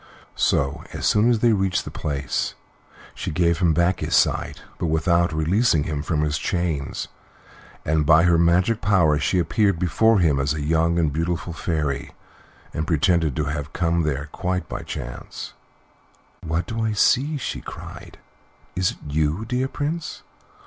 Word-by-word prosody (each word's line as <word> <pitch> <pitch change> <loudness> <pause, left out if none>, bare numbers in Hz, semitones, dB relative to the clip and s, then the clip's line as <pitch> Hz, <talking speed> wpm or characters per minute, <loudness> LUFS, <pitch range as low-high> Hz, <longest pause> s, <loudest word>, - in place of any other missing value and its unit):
So, 70 0 0
as - - -4
soon 110 +3 +4
as 115 -3 +2
they 120 -2 +4
reached 95 -2 0
the - - -7
place, 70 -3 -2 0.6
she - - -5
gave 85 +1 +1
him 85 -3 +3
back 85 +3 +2
his 80 +1 -1
sight, 80 - +1 0.2
but - - -1
without 85 +2 +2
releasing 80 +2 +2
him 75 -2 -3
from 75 0 -1
his 75 0 0
chains, 85 -6 -2 0.8
and 80 0 +2
by 80 +2 +5
her 85 -2 +4
magic 90 +7 +3
power 85 -7 +3
she 90 - +1
appeared 95 +3 +2
before 110 +6 +3
him 80 -7 +2
as 70 +3 0
a 75 - -3
young 80 +2 +2
and 80 -4 +1
beautiful 85 +2 -2
fairy, 75 -5 -2 0.6
and 80 0 -3
pretended 80 -3 +2
to 75 - 0
have 75 +1 -4
come 85 -1 +1
there 75 -2 -2
quite 90 -1 -2
by - - -5
chance. 65 0 -7 0.9
"What 80 +2 -1
do 115 0 -3
I 110 -1 0
see?" 135 +8 +2
she 135 - -4
cried. - - -10 0.6
"Is 90 0 +1
it - - -17
you, 75 +7 0
dear 125 +2 -1
Prince? 155 +4 -4
85 Hz, 165 wpm, -23 LUFS, 75-95 Hz, 0.9 s, by